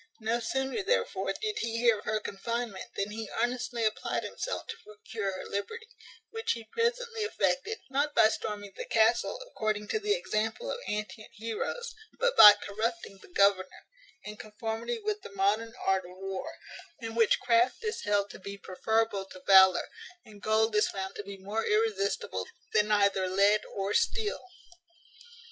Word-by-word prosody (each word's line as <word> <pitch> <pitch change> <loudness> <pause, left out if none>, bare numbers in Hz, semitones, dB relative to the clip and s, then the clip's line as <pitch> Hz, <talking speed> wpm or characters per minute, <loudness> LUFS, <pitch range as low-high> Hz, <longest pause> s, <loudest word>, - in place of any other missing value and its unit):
No 225 +2 0
sooner, 265 - -1
therefore, 450 +6 0
did 430 0 -2
he 230 0 -2
hear 230 -2 +4
of - - -13
her 215 0 0
confinement, 225 0 -4
than 200 +1 -2
he 220 0 -6
earnestly 245 -1 -1
applied 215 - -1
himself - - -4
to - - -7
procure 210 -1 -5
her 185 - -7
liberty; 440 - -5 0.4
which 450 0 -1
he 230 - -7
presently 465 - -1
effected, 440 0 0
not 285 +2 0
by - - +7
storming 205 -2 -5
the - - -6
castle, 230 - +2
according 215 - -2
to 440 - 0
the 420 0 +1
example 225 - -2
of - - -4
antient 210 +1 -4
heroes, 230 - -4 0.3
but - - +2
by 210 - +12
corrupting 205 - -4
the - - -15
governor, 190 0 +2 0.4
in 210 0 -8
conformity 220 - -4
with 425 -1 -3
the - - -9
modern 215 +4 +1
art 190 -1 +1
of 180 +1 -12
war, 195 0 -5 0.5
in 225 -2 -6
which 225 -1 +3
craft 240 - +2
is 440 0 -2
held 205 0 0
to - - -11
be 200 +1 -7
preferable 205 +1 -1
to 185 - -12
valour, 190 -2 +7 0.4
and 210 -2 -14
gold 220 0 +2
is 210 - +3
found 190 0 -5
to - - -4
be 200 0 -8
more 205 +4 -3
irresistible 200 - 0 0.3
than 210 0 +3
either 200 -2 +3
lead 200 +3 +4
or 195 +1 -1
steel. 435 -2 0
220 Hz, 165 wpm, -29 LUFS, 200-255 Hz, 0.5 s, by